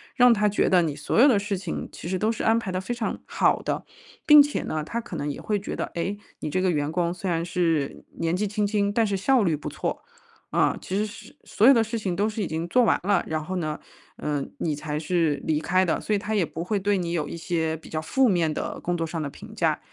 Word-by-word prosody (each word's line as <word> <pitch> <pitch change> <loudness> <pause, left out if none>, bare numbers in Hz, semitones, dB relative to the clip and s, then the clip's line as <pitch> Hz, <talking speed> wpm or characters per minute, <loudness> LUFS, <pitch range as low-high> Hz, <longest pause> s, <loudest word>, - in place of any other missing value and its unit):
让 250 -2 +7
他 210 -1 +2
觉 200 - +1
得 180 -2 +5
你 155 -3 -1
所 - - -2
有 265 - +8
的 225 -6 +4
事 200 -1 -2
情 180 -3 -4
其 - - -8
实 185 0 -1
都 215 - +1
是 230 - -4
安 225 +1 +4
排 220 - -5
得 185 - -1
非 240 - -3
常 235 -2 -3
好 - - +2
的。 - - -2 0.4
并 295 -1 +10
且 290 0 -2
呢， 155 -1 -2
他 230 +9 -3
可 205 - -8
能 145 -2 -2
也 - - -7
会 210 - 0
觉 200 - -5
得， - - -1
哎， 185 +4 -1 0.2
你 - - -4
这 185 - +1
个 185 - +2
员 150 -3 0
工 170 0 0
虽 180 +1 -4
然 165 0 0
是 165 -5 0 0.2
年 165 +1 0
纪 205 +3 0
轻 210 +1 0
轻， 200 -1 +1
但 225 +1 +2
是 200 - -1
效 245 +5 +3
率 165 -5 +2
不 150 - -6
错， - - -4 0.5
啊， - - +2
其 190 - -3
实 210 - +1
是 220 +1 -11
所 215 - +2
有 270 - +9
的 235 - +4
事 225 +1 -3
情 190 -5 -2
都 205 +2 +2
是 215 -1 -3
已 - - -2
经 160 +2 -3
做 250 +7 +4
完 225 - +3
了， 200 +1 +2
然 155 -1 -2
后 185 +4 -4
呢， 155 -3 -3 0.4
呃， 145 -2 -2 0.2
你 155 -3 -1
才 150 0 -4
是 160 -2 0
离 155 -1 +1
开 185 +4 +2
的， 170 - 0
所 215 - -1
以 - - 0
他 215 +2 -3
也 195 -5 +2
不 165 - -6
会 205 +3 -1
对 200 +1 +1
你 170 -2 -2
有 155 -4 -1
一 - - -5
些 165 -2 -1
比 160 - -14
较 155 - -2
负 260 +11 +2
面 170 -5 +2
的 - - -4
工 175 0 -1
作 165 -1 -2
上 160 0 -4
的 145 - -3
评 - - -12
价。 - - +1
185 Hz, 295 characters per minute, -25 LUFS, 160-210 Hz, 0.5 s, 并